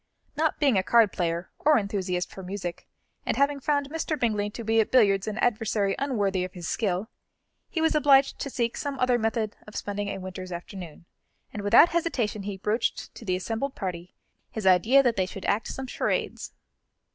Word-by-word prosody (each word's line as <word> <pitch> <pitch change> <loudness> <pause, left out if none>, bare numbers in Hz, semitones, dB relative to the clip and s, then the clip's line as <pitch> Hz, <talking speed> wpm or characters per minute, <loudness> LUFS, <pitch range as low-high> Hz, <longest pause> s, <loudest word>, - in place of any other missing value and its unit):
Not 315 0 +1
being 270 -9 +4
a - - -1
card 230 -1 +4
player, 170 0 -2
or 305 0 +4
enthusiast 190 -4 -2
for 190 - -9
music, 185 -2 -6 0.4
and - - -1
having 280 0 +2
found 285 0 0
Mr. 320 -1 -2
Bingley 210 -3 0
to 230 +2 -7
be 225 +1 +2
at 220 - +2
billiards 200 -6 +4
an 215 0 -3
adversary 215 -4 +1
unworthy 205 -9 0
of 185 - -6
his 175 -3 -7
skill, 200 -2 -1 0.6
he 325 - -2
was 320 - +3
obliged 280 -2 +4
to 275 - -3
seek 235 -3 -1
some 280 -1 -3
other 250 -1 +2
method 220 -1 -1
of 210 - -12
spending 205 0 -3
a - - -3
winter's 185 -1 -7
afternoon, 175 -2 -8 0.5
and 210 - -4
without 205 +11 +6
hesitation 285 -11 -1
he 200 0 -5
broached 210 +4 -1
to - - -11
the 185 -4 0
assembled 225 +9 -3
party 180 -2 -5 0.3
his 220 -3 -6
idea 215 +9 +5
that 240 -3 +1
they 185 -1 +1
should 195 - -8
act 210 +2 0
some 265 - -5
charades. 255 - -2
215 Hz, 190 wpm, -26 LUFS, 190-260 Hz, 0.6 s, without